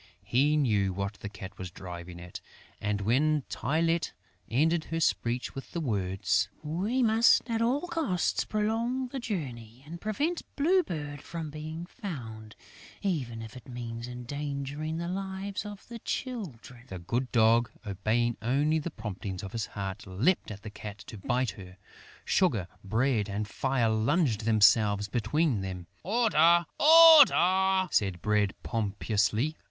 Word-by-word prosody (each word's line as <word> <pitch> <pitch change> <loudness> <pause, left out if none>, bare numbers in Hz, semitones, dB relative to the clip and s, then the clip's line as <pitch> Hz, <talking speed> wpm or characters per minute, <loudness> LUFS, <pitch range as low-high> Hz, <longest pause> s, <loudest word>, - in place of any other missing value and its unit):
He 145 +5 +2
well - - +3
knew 100 -6 +1
what 100 +2 -3
the 105 - -6
Cat 95 -1 -10
was 95 -1 -5
driving 85 -1 -9
at; 90 0 -9 0.4
and, 105 -1 -1
when 145 +7 +2
Tylette 165 +3 0 0.4
ended 160 +8 +2
her 165 - -3
speech 120 -5 0
with 135 - -9
the 170 - -2
words, 95 - 0
"We 195 +12 0
must 225 +3 +4
at 230 -1 -1
all 250 +5 +2
costs 325 - 0
prolong 230 +4 -1
the 270 - -4
journey 130 - -5
and 170 +3 -9
prevent 295 - -1
Blue 355 +6 +4
Bird 150 - -6
from 165 -2 -6
being 155 +3 -6
found, 115 - -8 0.5
even 130 - -2
if 110 +1 -10
it 125 - -12
means 120 -1 -6
endangering 140 +4 -4
the 170 +1 -3
lives 195 +2 -4
of 205 -1 -10
the 235 -1 -8
Children," 150 - -5
the 95 - -7
good 120 +9 -2
Dog, 115 0 +4 0.2
obeying 110 +4 0
only 145 +7 +2
the 155 - -4
promptings 105 - -6
of 95 - -6
his 115 -2 -3
heart, 100 0 -6
leapt 115 - +1
at 105 -1 -8
the 110 - -7
Cat 105 -1 -8
to 110 - -9
bite 125 +2 0
her. 95 -1 -12 0.5
Sugar, 115 - +2 0.2
Bread 110 +1 +1
and 105 +1 -3
Fire 130 0 0
flung 115 +11 +2
themselves 105 -2 +3
between 130 +1 0
them: 95 -2 -5 0.2
"Order! 175 -6 +4
Order!" 190 - +7
said 95 -4 +1
Bread 105 -2 +1
pompously. 110 +5 0
130 Hz, 145 wpm, -29 LUFS, 105-175 Hz, 0.5 s, Order